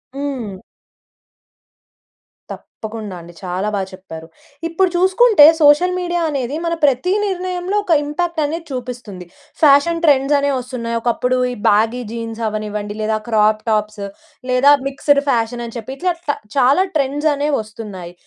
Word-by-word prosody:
హ్మ్. 255 -9 -5 1.9
తప్పకుండా 215 -3 -8
అండి. 170 +1 -13
చాలా 185 +2 -2
బాగా 195 -1 -2
చెప్పారు. 165 -4 -10 0.4
ఇప్పుడు 355 +3 +1
చూసుకుంటే, 375 0 +5 0.2
సోషల్ 300 +5 +5
మీడియా 350 -1 -1
అనేది 275 -2 -3
మన 335 - 0
ప్రతి 285 +6 +2
నిర్ణయంలో 365 0 -3
ఒక 360 - +1
ఇంపాక్ట్ 335 +3 -2
అనేది 325 +3 -4
చూపిస్తుంది. 240 -7 -7 0.4
ఫ్యాషన్ 305 +3 +4
ట్రెండ్స్ 280 -1 +4
అనేవి 280 -1 0
వస్తున్నాయి. 240 -2 -5
ఒకప్పుడు 250 +2 0
ఈ - - -4
బ్యాగీ 225 +4 +2
జీన్స్ 230 -1 -6
అవ్వనివ్వండి 210 -1 -4
లేదా 215 0 0
క్రాప్ 215 -1 +2
టాప్స్ 210 -1 -1 0.5
లేదా 255 +3 +5 0.2
మిక్స్డ్ 280 +1 +2
ఫ్యాషన్ 240 -1 0
అని 230 - -9
చెప్పి, 235 +3 -6
ఇట్లా 360 +2 0
ట - - +3 0.3
చాలా 275 +8 +4
ట్రెండ్స్ 290 +2 0
అనేవి 290 0 0
వస్తున్నాయి. 205 -5 -9
255 Hz, 135 wpm, -18 LUFS, 215-300 Hz, 1.9 s, చూసుకుంటే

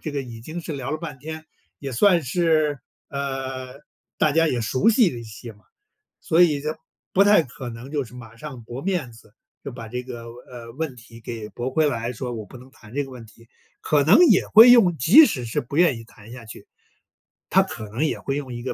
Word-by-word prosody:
这 155 - -5
个 140 -1 -2
已 115 -3 -10
经 160 +8 -7
是 160 - -6
聊 135 -1 -5
了 155 - -2
半 150 -5 -8
天， 155 +2 -8 0.3
也 135 -2 -6
算 175 +6 +4
是， 155 -1 +1 0.3
呃， 135 -1 -5 0.4
大 150 - +2
家 165 +2 +3
也 125 -4 -1
熟 130 - +1
悉 225 -5 +4
了 120 - -7
一 - - -8
些 110 +2 -10
嘛。 105 0 -25 0.6
所 165 +2 +3
以 150 -5 +3
就 150 - -3 0.4
不 195 - +5
太 205 -5 +5
可 125 -1 -9
能 120 +4 -10
就 145 -3 -1
是 120 - -16
马 115 -2 -12
上 130 -3 -9
驳 120 +4 -8
面 175 -10 -2
子， 110 -2 -19 0.3
就 140 - -6
把 115 -2 -8
这 125 +2 -5
个， 120 -2 -8 0.3
呃， 120 -2 -10
问 150 -2 -4
题 115 -1 -14
给 110 -2 -7
驳 120 +5 -4
回 155 +1 +2
来， 120 -1 -3
说： 125 +1 -5
“我 110 - -7
不 100 - -15
能 125 +2 -15
谈 110 -3 -17
这 145 0 -1
个 135 - -11
问 120 -3 -10
题”， 115 +1 -20 0.3
可 145 -2 +2
能 160 - +6
也 - - +3
会 230 +3 +9
用 195 -8 +5
即 210 - +7
使 130 - -2
是 115 - -2
不 125 +3 -9
愿 170 -8 +4
意 - - -11
谈 110 0 -16
下 120 -2 -10
去， 110 - -11 0.8
他 - - +5
可 110 - -8
能 120 +9 -1
也 - - -2
会 135 - -3
用 130 -4 -6
一 120 - -7
个 130 - -3
130 Hz, 250 characters per minute, -23 LUFS, 120-155 Hz, 0.8 s, 会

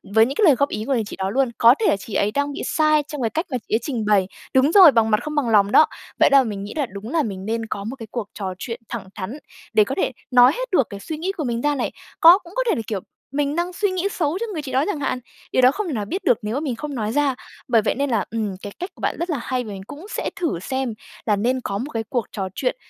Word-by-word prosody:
với 220 0 +7
những 270 +4 -4
cái 425 - +3
lời 300 -6 +7
góp 280 +3 +1
ý 215 - -4
của 275 - 0
người 235 -4 +1
chị - - -7
đó 190 0 -2
luôn. 260 +4 +1
Có 235 +2 +7
thể 450 - 0
là - - +3
chị 200 +2 -10
ấy 205 - +1
đang 285 +4 -1
bị - - -5
sai 305 -1 +3
trong 295 -3 -5
cái 230 - +1
cách 320 - -2
mà 255 - 0
chị - - +2
ấy - - +2
trình 235 -4 -3
bày 200 -3 +3 0.3
Đúng 265 +3 +4
rồi, 365 -4 +9
bằng 225 -3 +2
mặt 215 - +4
không 300 0 -4
bằng 275 -6 +1
lòng 205 -2 +4
đó! 310 - +7 0.3
Vậy - - +6
đa 275 -1 +6
mình 205 -4 -4
nghĩ 205 - -7
là 290 - +1
đúng 200 0 -8
là 320 +2 +1
mình 195 -4 -5
nên 225 +1 -2
có 200 -2 -4
một 225 +6 -5
cái 230 -4 -9
cuộc 235 -4 -4
trò 190 -3 -4
chuyện 230 +4 -6
thẳng 220 -5 -5
thắn 210 +9 -5 0.4
để 215 - +6
có 265 +6 -4
thể - - 0 0.2
nói 250 +1 +7
hết - - -4
được 275 - +3
cái 200 - -7
suy 310 +10 -6
nghĩ 355 +5 -2
của 355 -5 -4
mình 235 -3 -2
ra 295 +1 +1
này. 255 - -2 0.3
Có 340 +3 +9
cũng 350 -3 -15
có - - +1
thể - - +3
là, - - -2
kiểu, 205 -4 -2 0.3
mình 285 +1 -1
đang 350 +2 -1
suy 405 +2 0
nghĩ 370 +1 0
xấu 325 0 -1
cho 465 - -1
người 315 - -3
chị 280 -3 -7
đó 265 - +2
chẳng 320 -8 -2
hạn? 260 -2 -1 0.3
Điều - - +3
đó 255 +1 +7
không 390 +6 -3
thể 310 - -3
nào 210 -4 -2
biết 375 - -4
được 245 - +4
nếu 210 +2 -3
mà - - 0
mình 285 -5 -2
không 290 +4 -6
nói 215 -3 -2
ra. 280 0 +1 0.3
Bởi 230 -3 +4
vậy 215 - 0
nên 280 +1 -1
là, 225 -5 +1
ừm, 215 -4 -2
cái 205 - -7
cách 360 - -4
của - - -16
bạn - - 0
rất 340 +2 -2
là 310 - 0
hay, 255 -1 -1
và - - -10
mình 195 -1 -7
cũng 305 +6 -9
sẽ - - -2
thử 330 - -1
xem 260 +5 -2 0.3
là 210 - +3
nên 250 +5 0
có 200 - -3
một 265 +8 -5
cái 225 -1 -1
cuộc 240 -5 -1
trò 195 -3 -3
chuyện, - - -1
255 Hz, 315 wpm, -22 LUFS, 220-300 Hz, 0.4 s, rồi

